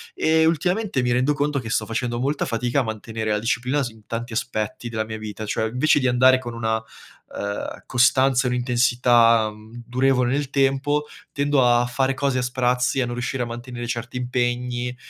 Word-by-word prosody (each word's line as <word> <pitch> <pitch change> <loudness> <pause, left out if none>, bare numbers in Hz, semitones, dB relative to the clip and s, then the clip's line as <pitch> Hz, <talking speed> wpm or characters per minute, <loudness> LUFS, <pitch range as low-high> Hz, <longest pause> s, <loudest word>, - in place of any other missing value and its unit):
E 160 0 +3
ultimamente 175 +1 0
mi 125 0 0
rendo 130 +4 +2
conto 145 -1 -1
che 115 - -7
sto - - 0
facendo 120 +1 -2
molta 140 +2 0
fatica 120 +2 0
a 135 - +1
mantenere 110 0 -4
la 105 - +1
disciplina 125 +5 0
su 110 -3 -8
tanti 115 +1 -5
aspetti 110 0 -3
della 110 -2 -2
mia 110 0 -6
vita. 110 0 -6
Cioè 110 +1 -1
invece 130 +5 +2
di 130 - +1
andare 130 +1 +5
con 120 -2 -7
una, 110 -1 -1
uhm, 100 -2 -8
costanza 130 +1 +3
e - - +1
un'intensità, 120 -2 +3
mhmm, 110 +3 -12
durevole 125 0 +1
nel 140 -1 -1
tempo, 140 +2 +1 0.3
tendo 140 -2 +2
a 120 0 +4
fare 130 +2 0
cose 135 -1 -1
a - - +1
sprazzi, 125 +1 0
a 125 - +1
non 120 - -4
riuscire 125 +1 -2
a - - -3
mantenere 120 +1 -7
certi 120 +1 -5
impegni, 125 0 -2
125 Hz, 185 wpm, -23 LUFS, 115-135 Hz, 0.3 s, andare